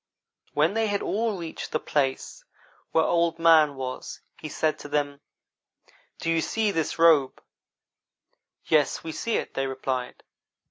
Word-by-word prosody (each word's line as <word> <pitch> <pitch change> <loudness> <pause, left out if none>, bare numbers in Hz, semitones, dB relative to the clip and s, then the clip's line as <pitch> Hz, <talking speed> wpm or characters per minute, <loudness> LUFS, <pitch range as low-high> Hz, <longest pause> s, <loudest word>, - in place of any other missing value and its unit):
When 155 +5 +3
they 225 0 +1
had 205 -1 -1
all 220 -1 -1
reached 165 -2 -6
the 155 - 0
place 135 -4 -2 0.5
where 160 - +3
Old 170 -1 +1
man 160 -3 +5
was 130 -1 -6 0.2
he 155 - -6
said 155 +1 -1
to - - -8
them: 145 -1 -2 1.0
"'Do 165 - -1
you 165 0 +2
see 220 +2 0
this 160 -4 -2
robe?' 160 -5 +4 1.3
"'Yes, 150 -2 +2
we 165 - -5
see 230 +8 -2
it,' - - -5
they 135 0 -1
replied. 130 -1 -4
160 Hz, 145 wpm, -26 LUFS, 145-170 Hz, 1.3 s, man